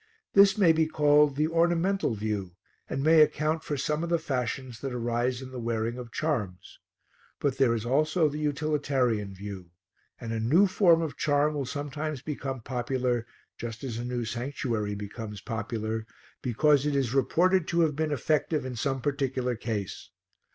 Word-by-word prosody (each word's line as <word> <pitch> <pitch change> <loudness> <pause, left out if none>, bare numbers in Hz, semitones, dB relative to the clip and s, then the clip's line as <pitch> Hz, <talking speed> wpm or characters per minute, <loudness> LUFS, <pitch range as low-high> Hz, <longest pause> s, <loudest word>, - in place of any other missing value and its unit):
This 200 +1 +6
may 185 -6 +6
be 160 0 +2
called 150 -2 +4
the 150 +2 +2
ornamental 170 - +1
view 100 -4 -3 0.3
and 135 - -2
may 160 +1 +6
account 155 +1 +2
for 145 - -3
some 150 +4 -1
of 170 - -3
the 170 - +3
fashions 130 -4 -3
that 135 -3 -4
arise 120 +2 -1
in 130 - -9
the 130 - -6
wearing 115 +1 -2
of 120 -2 -8
charms. 120 - -3 0.6
But 135 -2 -1
there 120 -4 +4
is 115 0 -4
also 155 +6 +2
the 150 +1 -4
utilitarian 140 -9 0
view, 95 -2 -8 0.5
and 115 0 -5
a 115 - -1
new 150 - +4
form 175 -4 +4
of 155 - -5
charm 145 +1 +2
will 140 -3 -3
sometimes 145 0 -4
become 135 -4 -4
popular, 125 -1 -1 0.3
just 115 0 -6
as 120 -4 -4
a - - -3
new 120 -1 -2
sanctuary 115 -3 -2
becomes 105 +1 -7
popular, 110 0 -4 0.3
because 145 +4 +3
it 145 - 0
is 130 -3 0
reported 175 +6 +3
to 170 - +2
have 155 -3 +2
been 155 0 -1
effective 150 +1 0
in 130 -1 -5
some 135 +2 -1
particular 130 -3 -1
case. 110 -4 -4
135 Hz, 170 wpm, -28 LUFS, 115-155 Hz, 0.6 s, This